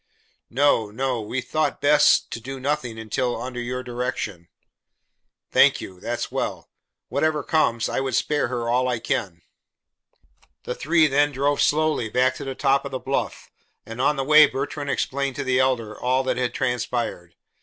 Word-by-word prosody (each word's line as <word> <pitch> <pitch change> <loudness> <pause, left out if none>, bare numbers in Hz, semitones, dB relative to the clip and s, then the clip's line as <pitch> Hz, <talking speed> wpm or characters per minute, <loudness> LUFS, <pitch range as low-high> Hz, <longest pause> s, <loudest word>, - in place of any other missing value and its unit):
"No, 125 -4 +2
no. 125 +2 -2
We 125 +5 -3
thought 155 +5 -1
best 150 0 +4
to 115 - -5
do 135 +3 -7
nothing 130 -4 -2
until 120 +2 -2
under 125 +1 -5
your 125 +1 -4
direction." 120 -8 -4 1.0
"Thank - - +5
you. 90 -1 -9
That's - - -4
well. - - -4 0.4
Whatever 155 -2 0
comes, 115 -8 +1
I - - -2
would 135 -3 -1
spare 150 -1 +1
her 120 -1 -3
all 125 +2 +2
I 125 -1 0
can." 90 -6 -3 1.2
The - - -3
three 160 +2 +3
then 145 0 +2
drove 140 +1 0
slowly 155 -6 +1
back 130 +3 +2
to - - -6
the 135 -1 -5
top 140 0 +2
of 140 - -5
the 130 - -3
bluff, 135 +1 -3 0.3
and 115 +3 -6
on 150 +3 +3
the 135 - -2
way 155 +2 +7
Bertrand 140 +2 -4
explained 140 0 -1
to 145 - -3
the 130 -1 +1
Elder 120 -5 0
all 130 +3 0
that 130 - -1
had 125 -1 -1
transpired. 120 -8 -2
130 Hz, 170 wpm, -23 LUFS, 120-140 Hz, 1.2 s, way